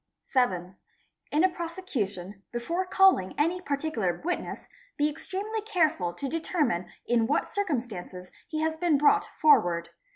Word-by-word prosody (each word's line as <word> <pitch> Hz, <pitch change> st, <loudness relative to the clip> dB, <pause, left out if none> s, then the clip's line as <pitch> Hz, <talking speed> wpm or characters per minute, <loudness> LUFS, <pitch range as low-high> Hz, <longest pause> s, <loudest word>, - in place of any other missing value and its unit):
7. 185 Hz, -8 st, 0 dB, 0.5 s
Ina 320 Hz, +6 st, +4 dB
prosecution, 250 Hz, -, -4 dB
before 335 Hz, +11 st, -2 dB
calling 380 Hz, -, +4 dB
any 340 Hz, +5 st, +1 dB
particular 280 Hz, -, -1 dB
witness, 355 Hz, -, -3 dB, 0.3 s
be 295 Hz, -, +3 dB
ex 300 Hz, -, -7 dB
remely 420 Hz, +3 st, -2 dB
careful 315 Hz, -, +1 dB
to 225 Hz, +11 st, -5 dB
determine 300 Hz, -, -1 dB
in 235 Hz, -2 st, +2 dB
what -, -, 0 dB
circumstances 230 Hz, -, -3 dB, 0.2 s
he 310 Hz, -1 st, -3 dB
has 315 Hz, 0 st, 0 dB
been 320 Hz, -2 st, +2 dB
brought 415 Hz, +9 st, +4 dB
orward. 175 Hz, -, +4 dB
295 Hz, 130 wpm, -28 LUFS, -, 0.5 s, Ina